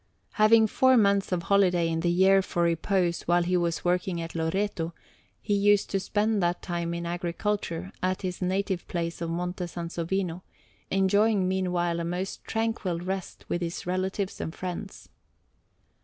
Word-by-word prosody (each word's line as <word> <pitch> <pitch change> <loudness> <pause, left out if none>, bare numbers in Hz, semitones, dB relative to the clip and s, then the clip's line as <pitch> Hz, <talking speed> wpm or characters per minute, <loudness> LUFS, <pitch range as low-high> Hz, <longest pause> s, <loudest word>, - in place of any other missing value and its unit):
Having 220 +1 +5
four 260 +4 +4
months 200 -3 +3
of 175 -2 0
holiday 180 -4 +3
in 165 0 -1
the 170 +1 +1
year 190 +2 +5
for 175 -2 -1
repose 170 +1 +1
while 175 0 +4
he 180 +1 0
was 170 -1 0
working 180 0 0
at 165 0 -5
Loreto, 165 0 -1 0.4
he 205 - -2
used 205 0 +3
to 195 - +1
spend 210 +2 0
that 175 0 0
time 170 -1 -2
in 170 0 -4
agriculture 175 +1 -2
at 185 +1 -1
his 180 0 -4
native 190 0 -1
place 170 -1 -3
of 170 - -2
Monte 180 +2 -3
Sansovino, 170 +1 -3 0.5
enjoying 195 +1 +3
meanwhile 180 -2 0
a - - -2
most 180 +3 -4
tranquil 225 -6 -1
rest 185 +2 -5
with 175 - -2
his 170 0 -4
relatives 185 +2 -2
and 160 - -5
friends. 185 +2 -6
180 Hz, 155 wpm, -27 LUFS, 170-195 Hz, 0.5 s, Having